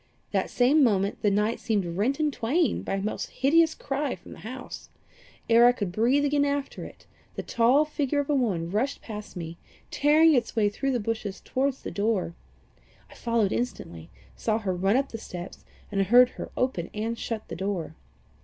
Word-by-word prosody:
That - - 0
same 275 +5 +4
moment 200 -4 +1
the 205 - +3
night 210 +3 +1
seemed 210 -5 0
rent 245 - 0
in 305 -1 +2
twain 285 +7 0
by - - -3
a 195 - -2
most 215 - -3
hideous 320 +4 +3
cry 275 0 -2
from 180 - -15
the - - -11
house. 255 +4 -8 0.6
Ere 235 +1 +7
I - - +7
could 205 -7 -3
breathe 245 +9 +2
again 285 0 +2
after 285 -1 -2
it, - - -12 0.3
the - - -4
tall 250 +6 +3
figure 290 -1 -1
of 285 - -1
a 295 - +1
woman 190 -11 0
rushed 250 +8 -1
past 210 -2 -8
me, 165 0 -7 0.3
tearing 310 +2 +5
its 240 -5 0
way 210 -2 +3
through 270 +6 -2
the 245 - +1
bushes 215 -2 -3
towards 265 0 -2
the - - -5
door. 200 -4 0 0.8
I - - -12
followed 230 -4 0
instantly, 85 - -4 0.3
saw 215 - 0
her 200 -4 -2
run 195 +4 +1
up 275 +1 0
the 225 - -7
steps, 180 -3 -9 0.3
and 200 -1 +1
heard 240 +6 +6
her - - -8
open 250 -10 -1
and 225 +2 -2
shut 225 -1 -5
the - - -6
door. 185 -3 -3
230 Hz, 190 wpm, -26 LUFS, 200-275 Hz, 0.8 s, Ere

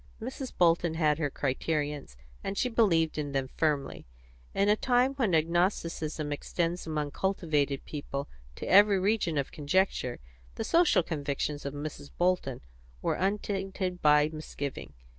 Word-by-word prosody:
But 225 - -4
Mrs. 260 0 -6
Bolton 170 -1 +3
had 155 -2 +2
her 145 -3 0
criterions, 145 - -2 0.3
and 195 0 -3
she 250 - +1
believed 165 -10 +2
in 145 -2 -3
them 135 -1 -1
firmly; 145 - -1 0.4
in 200 - +1
a 210 - +5
time 250 +3 +2
when 230 -11 +1
agnosticism 165 -2 0
extends 170 +3 -2
among 150 -2 -2
cultivated 150 -8 0
people 140 -1 -5 0.3
to - - -6
every 205 +1 +6
region 190 -5 +1
of 140 - -1
conjecture, 150 -4 0 0.4
the - - -3
social 330 - +4
convictions 145 -2 -3
of 140 - -5
Mrs. 145 -1 -6
Bolton 175 -8 +1 0.4
were - - +1
untainted 195 -2 -2
by 150 0 +5
misgiving. 145 -2 -6
160 Hz, 140 wpm, -29 LUFS, 145-190 Hz, 0.4 s, every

